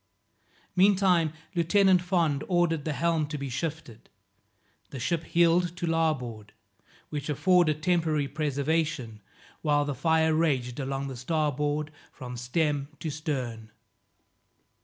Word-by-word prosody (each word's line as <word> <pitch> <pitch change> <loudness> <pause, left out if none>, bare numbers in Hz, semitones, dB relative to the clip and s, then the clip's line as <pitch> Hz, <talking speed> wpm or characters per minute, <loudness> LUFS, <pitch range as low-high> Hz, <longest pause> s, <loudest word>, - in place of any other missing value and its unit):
Meantime 185 -4 +4 0.2
Lieutenant 185 +2 +4
Fond 170 -6 +1
ordered 175 -4 +1
the 155 - -1
helm 165 0 0
to 150 0 -5
be 140 -1 -5
shifted. 145 -3 -5 0.8
The 135 - -7
ship 165 +6 -1
heeled 170 +1 +2
to 175 - -2
larboard, 130 -11 -1 0.6
which 150 -1 -5
afforded 170 0 +3
a - - -18
temporary 160 -4 +1
preservation, 145 -5 -1 0.4
while 145 -2 +2
the 145 - -2
fire 160 +3 +2
raged 135 -6 0
along 135 0 -3
the 135 - -6
starboard 150 +2 -1 0.2
from 125 -3 -8
stem 140 +3 -1
to 160 - -3
stern. 130 -7 -4
155 Hz, 120 wpm, -27 LUFS, 140-165 Hz, 0.8 s, Meantime